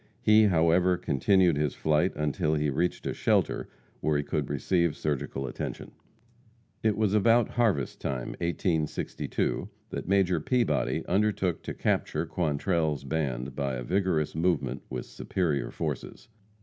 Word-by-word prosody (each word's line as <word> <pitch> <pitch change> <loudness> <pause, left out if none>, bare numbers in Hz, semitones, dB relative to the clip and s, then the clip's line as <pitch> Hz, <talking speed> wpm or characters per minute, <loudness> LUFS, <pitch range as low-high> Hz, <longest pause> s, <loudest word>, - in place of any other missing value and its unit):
He, 110 0 +6
however, 90 0 +3
continued 90 +1 +3
his 75 -2 0
flight 80 +4 +2
until 75 +1 0
he 75 -1 0
reached 85 +6 -1
a - - -1
shelter - - +1 0.3
where 75 -1 +1
he 75 - 0
could 70 -1 -2
receive 85 +3 +1
surgical 70 -2 -2
attention. 65 - -5 0.9
It 110 -2 +1
was 105 -2 +1
about 115 +2 +4
harvest 110 - 0
time, 65 -3 -3
1862, 85 +2 -1 0.2
that - - -5
Major 95 -3 +3
Peabody 120 - 0
undertook 100 -4 +1
to - - -6
capture - - 0
Quantrell's 80 -2 0
band 70 -3 -2
by 70 -2 -1
a 60 - -4
vigorous 90 -1 0
movement 85 +2 0
with 65 -2 -4
superior 80 -7 -2
forces. - - -5
80 Hz, 135 wpm, -28 LUFS, 75-95 Hz, 0.9 s, He